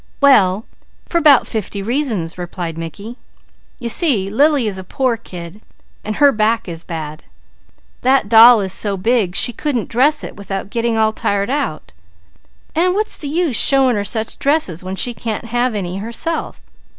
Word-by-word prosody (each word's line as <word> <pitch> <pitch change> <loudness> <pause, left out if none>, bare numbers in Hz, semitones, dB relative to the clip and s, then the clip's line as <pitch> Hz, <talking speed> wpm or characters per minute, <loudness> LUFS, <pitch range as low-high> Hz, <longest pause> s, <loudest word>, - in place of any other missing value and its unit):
"Well 210 -8 +4 0.4
for 340 - -1
'bout 285 -4 +6
fifty 205 -2 -5
reasons," 230 - -2
replied 175 -2 -6
Mickey. 200 - -8 0.6
"You 240 - -5
see 230 - +2
Lily 285 +2 +3
is 200 -3 -3
a - - -7
poor 250 +6 -1
kid, 180 -1 -10 0.4
and 215 0 -4
her 285 -1 +5
back 225 -1 0
is 165 -1 -6
bad. 155 -2 -7 0.8
That 260 -3 +2
doll 225 +1 +7
is 190 -1 -1
so 200 -1 0
big 205 -2 0
she 240 - +4
couldn't 250 -2 -3
dress 275 +6 +2
it - - -8
without 195 -1 -6
getting 230 -1 -1
all 220 0 +2
tired 200 +1 -1
out; 275 - -3 0.8
and 360 +3 +1
what's 430 +1 -1
the 295 - -7
use 320 -5 0
showing 270 -3 +4
her 205 - -1
such 220 +2 -2
dresses, 275 - 0
when 185 +1 -5
she 240 +6 +1
can't 225 -1 -5
have 240 0 -1
any 185 -2 -4
herself. 235 +10 -4
225 Hz, 165 wpm, -17 LUFS, 195-265 Hz, 0.8 s, doll